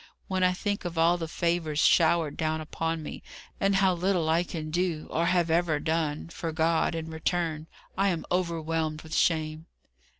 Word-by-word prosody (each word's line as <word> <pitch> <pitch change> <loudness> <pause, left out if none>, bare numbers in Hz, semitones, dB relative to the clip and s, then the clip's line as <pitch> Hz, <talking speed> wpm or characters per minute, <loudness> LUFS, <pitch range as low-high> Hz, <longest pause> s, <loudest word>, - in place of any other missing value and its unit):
When 185 -1 0
I 180 - +5
think 205 +2 -2
of 175 -2 -5
all 170 +2 +4
the 165 - -3
favours 165 -2 -1
showered 160 -1 +4
down 160 0 -1
upon 165 +1 -3
me, - - -7 0.4
and 195 0 +2
how 190 -1 +4
little 175 -2 0
I 165 +2 +3
can 155 -3 -6
do, 175 -2 -1
or 170 +1 +1
have 175 -2 +2
ever 165 -2 +2
done, 160 0 -1
for 165 -1 -4
God, 165 +1 +1
in 160 0 -5
return, 160 -1 -2 0.3
I 195 +1 +2
am 175 -4 -1
overwhelmed 165 -3 -1
with 160 0 -9
shame." 155 -1 +1
165 Hz, 175 wpm, -28 LUFS, 160-175 Hz, 0.4 s, I